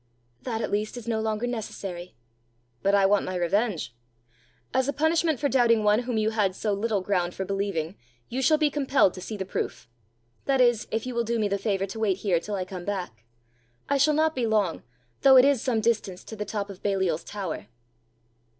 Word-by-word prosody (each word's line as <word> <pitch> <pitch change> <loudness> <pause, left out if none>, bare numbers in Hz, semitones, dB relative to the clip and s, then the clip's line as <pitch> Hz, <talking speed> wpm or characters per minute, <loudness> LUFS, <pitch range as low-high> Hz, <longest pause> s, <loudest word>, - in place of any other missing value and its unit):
"That, 230 -3 -3
at - - -3
least, 210 +3 -1
is 235 -1 -8
no 225 -1 0
longer 220 +1 -1
necessary!" 195 -6 -5 0.7
"But 200 +1 +3
I 200 -1 +4
want 205 +1 +3
my 185 - -4
revenge. 180 - 0 0.8
As 260 0 +2
a 285 - 0
punishment 320 -1 +1
for 290 - +1
doubting 235 -5 +3
one 210 +1 +4
whom 245 -2 -2
you 215 0 +1
had 205 -4 +1
so 210 0 -1
little 205 0 0
ground 180 -2 -1
for 190 - -3
believing, 195 -3 -2 0.3
you 260 +3 -3
shall 305 +4 +4
be 300 -1 +2
compelled 275 -8 +3
to 185 - -8
see 215 +3 -5
the 190 - -3
proof 190 - -4 0.6
that 270 -1 +2
is, 240 -3 +3
if 220 +2 -2
you 255 - -4
will 235 0 0
do 235 +1 -1
me 215 -2 +1
the 200 0 -1
favour 195 -2 0
to 200 +3 -7
wait 200 -4 +1
here 190 -4 +1
till 205 +4 -5
I 185 -2 -2
come 180 -1 -7
back. 175 - -5 0.6
I 280 0 +2
shall 300 +2 +4
not 315 +1 +2
be 250 -5 -1
long, 210 -6 +1 0.4
though 265 -1 +8
it 255 - +8
is 280 -4 +3
some 235 -4 0
distance 215 -5 -1
to 220 - -9
the 210 0 -4
top 205 0 -4
of 190 - -12
Baliol's 190 -5 0
tower." 195 -6 -5
215 Hz, 215 wpm, -26 LUFS, 195-245 Hz, 0.8 s, though